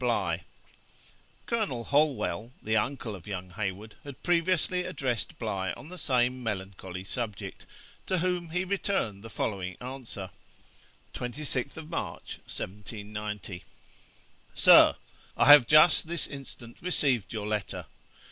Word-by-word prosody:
BLIGH.' - - +1 1.0
Colonel 210 - -1
Holwell, 140 -4 +1
the 110 +1 +1
uncle 120 -1 0
of 90 -1 -12
young 95 -2 -5
Heywood, 100 +2 -4
had 140 -1 -10
previously 180 +1 +2
addressed 130 -8 -2
Bligh 95 -5 -2
on 150 - -11
the 180 - -8
same 125 -2 +2
melancholy 95 -4 -4
subject, 105 -1 -5 0.4
to 185 - +1
whom 180 -1 0
he 180 +3 -1
returned 185 - -1
the 115 - -8
following 90 -6 -3
answer: 125 -7 -6 0.8
'26th 140 +3 -3
March, 165 - -5
1790. 105 -1 -6 0.9
'SIR, - - +8 0.4
I - - +4
have 145 -3 +10
just 155 +1 +6
this 170 0 0
instant 135 -4 -9
received 140 - +1
your 110 -2 -3
letter. 105 -2 -2
120 Hz, 120 wpm, -29 LUFS, 105-155 Hz, 1.0 s, have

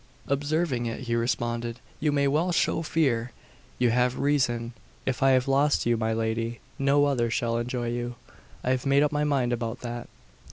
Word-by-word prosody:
Observing 145 -3 0
it, 115 - -4
he 120 -2 -3
responded, 120 0 -1 0.2
"You 150 0 +1
may 140 -1 +2
well 155 +6 +1
show 165 - +1
fear: 130 -8 0 0.4
you 125 -2 +3
have 125 +1 +2
reason. 120 -5 +1 0.3
If 130 - -1
I 135 - +5
have 130 0 +2
lost 140 +2 +3
you, 120 0 +3
my 110 0 0
lady, 115 +1 -1 0.2
no 140 +1 +4
other 125 -5 +1
shall 115 0 0
enjoy 120 0 -2
you. 120 0 -3 0.5
I 130 - +1
have 130 +1 0
made 140 +1 +5
up 150 - +1
my 150 0 0
mind 130 -4 +1
about 115 -1 -3
that." 120 0 -6
125 Hz, 185 wpm, -27 LUFS, 120-140 Hz, 0.5 s, I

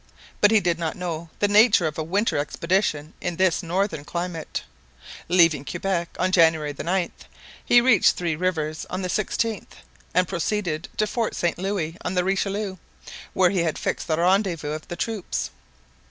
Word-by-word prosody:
But 210 - +7
he 220 0 +5
did 175 -3 0
not 165 -2 -2
know 170 -2 -4
the 205 - +2
nature 205 -3 +5
of 155 -2 -2
a - - 0
winter 200 +8 0
expedition 155 0 -1
in 175 -2 -2
this 185 0 +2
northern 180 -2 -1
climate. 170 +1 -4 0.7
Leaving 165 -5 +4
Quebec 175 +2 -2
on 185 0 +1
January 160 -4 +3
9, 175 +3 -1 0.5
he 240 - +6
reached 235 -6 +5
Three 170 -3 -1
Rivers 160 -3 -2
on 185 +1 -3
the 180 - -2
16th, 215 +2 -1 0.5
and 180 -1 +3
proceeded 175 -2 -2
to 215 - +3
Fort 225 +1 -2
Saint 175 0 -1
Louis 180 -4 -2
on 185 - -2
the 180 - +2
Richelieu, 195 +1 -1 0.6
where 185 -1 +4
he 195 - 0
had 165 -2 -1
fixed - - -2
the 160 -2 +1
rendezvous 175 -3 +1
of 155 0 -6
the 175 - -5
troops. 215 -1 -3
180 Hz, 170 wpm, -24 LUFS, 165-195 Hz, 0.7 s, But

